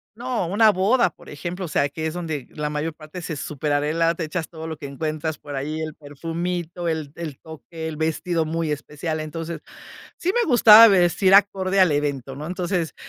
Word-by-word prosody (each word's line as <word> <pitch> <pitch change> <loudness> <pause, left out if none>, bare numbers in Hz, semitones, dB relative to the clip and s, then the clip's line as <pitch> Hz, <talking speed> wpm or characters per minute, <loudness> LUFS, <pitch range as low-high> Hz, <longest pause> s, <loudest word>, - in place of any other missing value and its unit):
No, 245 -3 -2
una 210 +6 +4
boda, 200 +3 +3
por - - -19
ejemplo, 175 +5 -5
o - - -5
sea, 145 -2 +1
que 160 +3 -5
es 160 - -2
donde 160 -6 -4
la 150 -1 -3
mayor 150 +2 -3
parte 155 +3 -10
se 160 - -4
superarregla, 150 +3 0
te 170 - -4
echas 160 +1 -3
todo 160 -1 -8
lo 160 -2 -5
que 150 - -9
encuentras 155 +2 -3
por 145 -1 -8
ahí, 155 +4 -3
el 155 -1 -5
perfumito, 170 +3 -4
el 155 -3 -2
el 160 -5 -7
toque, 160 +1 -8
el 155 - -5
vestido 160 +1 -1
muy 165 0 -2
especial. 150 +2 -4
Entonces, 165 +1 -6 0.6
sí 365 - 0
me 480 -4 +1
gustaba 230 -2 +9
vestir 190 0 +4
acorde 195 -1 +3
al 185 -4 +5
evento, 140 -3 -2
¿no? 150 +3 -6
Entonces, 180 -2 -2
160 Hz, 195 wpm, -23 LUFS, 150-180 Hz, 0.6 s, gustaba